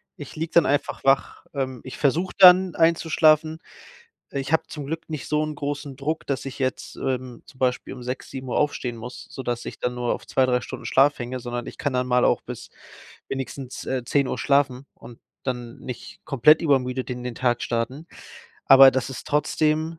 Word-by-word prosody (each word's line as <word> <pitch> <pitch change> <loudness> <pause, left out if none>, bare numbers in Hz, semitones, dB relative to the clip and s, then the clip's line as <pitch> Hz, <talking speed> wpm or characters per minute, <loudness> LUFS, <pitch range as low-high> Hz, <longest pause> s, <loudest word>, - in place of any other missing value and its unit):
ich 145 - -10
liege 160 +1 -4
dann 170 - +5
einfach 145 +1 -1
wach. 135 0 +1
Ähm, 130 -3 -3
ich 130 - -8
versuche 160 +6 +1
dann 185 -1 +8
einzuschlafen. 160 -1 +3 0.7
Äh, 140 - -3
ich 135 +3 -5
habe 160 - +3
zum 150 -2 -7
Glück 160 +3 -5
nicht 155 -3 -5
so 150 0 +1
'nen 155 - -5
großen 145 -1 -5
Druck, 150 +4 -3
dass 140 -2 -2
ich 135 -1 -7
jetzt, 130 -1 -3
ähm, 130 -2 -4
zum 130 - -17
Beispiel 125 0 -1
um 125 - -10
6:00, 125 +1 -5
7:00 130 -2 -3
aufstehen 125 -5 -1
muss, 120 +2 -9
sodass 120 -3 -4
ich - - -7
dann 125 0 -1
nur 125 -1 -1
auf - - -9
2, 130 - +2
3 125 -1 +1
Stunden - - -8
Schlaf 140 +2 +3
hänge, 125 +1 -5
sondern 120 0 -5
ich - - -9
kann 145 - -1
dann 125 0 0
mal 125 0 +3
auch - - +1
bis - - -8 0.6
wenigstens, 135 -1 -6
äh, 130 -2 -2
10:00 140 +2 0
schlafen 140 -2 +1
und 120 - -13 0.3
dann 120 -2 -4
nicht 125 -2 -9
komplett 145 +4 +5
übermüdet 130 -4 +1
in 125 0 -5
den 125 -1 -4
Tag 120 -2 0
starten. 125 +7 -3 0.6
Aber 135 0 +9
das 130 -1 -2
ist 130 - -8
trotzdem, 155 +2 0
135 Hz, 195 wpm, -24 LUFS, 125-150 Hz, 0.7 s, Aber